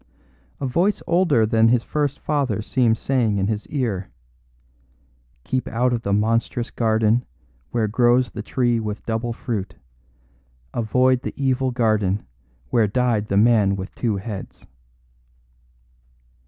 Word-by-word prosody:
A - - -3
voice 175 +10 +1
older 170 -9 +3
than 110 0 +3
his 115 0 +3
first 145 -2 -1
fathers 130 -9 -1
seemed 115 +1 +2
saying 120 -6 0
in 95 - +1
his 105 0 -3
ear: 110 -10 -2 1.3
"Keep 130 -1 -2
out 125 +2 +1
of 120 - -1
the 100 - -3
monstrous 115 +3 0
garden 110 +1 +2 0.5
where 115 -2 0
grows 120 +2 +3
the 105 - -6
tree 120 +1 0
with 105 -1 -5
double 115 +1 -2
fruit. 115 -5 -4 1.0
Avoid 125 +2 +2
the - - -6
evil 130 -1 +1
garden 110 -5 0 0.5
where 115 -3 +3
died 115 -1 0
the 100 - 0
man 105 -3 +4
with 95 0 -7
two 115 -4 -1
heads." 100 0 -7
115 Hz, 130 wpm, -22 LUFS, 105-125 Hz, 1.3 s, man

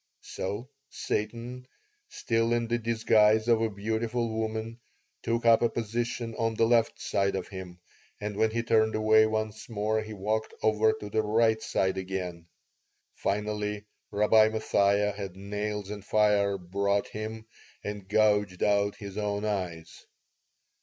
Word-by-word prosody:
So 100 +6 -5 0.2
Satan, 120 +4 -4 0.4
still 115 0 0
in 120 -1 0
the 120 +1 0
disguise 110 -1 +3
of 115 -2 +4
a 115 - +1
beautiful 110 +3 -2
woman, 110 +1 -3 0.4
took 115 0 -1
up 115 -1 +6
a 120 - +3
position 115 +1 -3
on 115 -1 0
the 115 - +3
left 115 -1 +2
side 100 -1 0
of 95 - -4
him; 95 -2 -8 0.4
and 105 0 -4
when 110 +2 +2
he 115 +1 -2
turned 110 -1 +2
away 110 0 +5
once 110 0 -3
more 110 0 0
he 110 0 -7
walked 110 +2 -2
over 110 0 +4
to 105 -1 -8
the 110 - +2
right 110 +1 +2
side 95 0 0
again. 90 -3 -5 0.7
Finally 105 0 -2 0.2
Rabbi 110 +1 +4
Mathia 105 -2 +2
had 100 -3 -6
nails 105 +1 -4
and 105 -2 -7
fire 105 -1 +2
brought 100 +3 -1
him 110 +1 -6 0.4
and 105 -2 -6
gouged 105 -3 +2
out 100 0 +2
his 100 0 -7
own 105 0 -2
eyes. 90 -6 -4
105 Hz, 145 wpm, -28 LUFS, 100-110 Hz, 0.7 s, up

